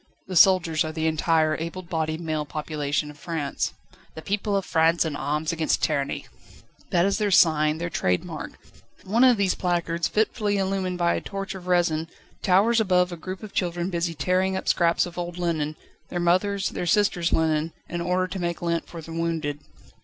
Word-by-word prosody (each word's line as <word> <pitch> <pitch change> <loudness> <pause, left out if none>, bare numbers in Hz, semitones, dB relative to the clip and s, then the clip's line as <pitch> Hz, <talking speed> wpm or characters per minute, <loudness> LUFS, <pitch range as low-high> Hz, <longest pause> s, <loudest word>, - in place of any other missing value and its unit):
The 185 - -6
soldiers 170 -2 +5
are 155 - -4
the 160 0 -3
entire 160 0 +2
able 170 +3 -5
bodied 160 -2 -2
male 155 -2 -2
population 150 0 -3
of 145 - -17
France. 155 -3 -3 0.4
"The 160 - -8
people 205 0 -1
of 195 - -2
France 165 +1 +3
in 155 -3 -2
arms 150 +3 -1
against 165 -1 0
tyranny!" 140 -3 -1 0.6
That 175 0 +3
is 200 +2 +1
their 210 -1 +1
sign, 155 -4 +4
their 170 +1 -4
trade 90 -1 0
mark; - - -7 0.5
one 220 +6 +2
of 250 -3 +6
these 195 -2 +2
placards, 170 -2 -1
fitfully 210 -1 0
illumined 190 -2 -1
by 170 -1 +2
a - - -2
torch 195 +1 -5
of 185 -2 -9
resin, 170 -3 +2 0.3
towers 210 +5 +4
above 180 -3 +2
a - - -4
group 185 +4 -7
of 215 - -9
children 175 0 -1
busy 170 -1 -1
tearing 185 +5 +1
up - - -6
scraps 170 -1 +3
of 175 0 -7
old 175 0 -4
linen 160 -3 -1 0.3
their 175 - -3
mothers', 185 +3 +1
their 175 - -4
sisters' 175 -3 +2
linen 160 0 +1 0.2
in 175 0 -4
order 180 +1 +1
to 190 +1 -5
make 170 -1 -3
lint 170 -1 -1
for 165 -2 -9
the 165 - -9
wounded. 165 -3 -2
170 Hz, 190 wpm, -25 LUFS, 160-185 Hz, 0.6 s, of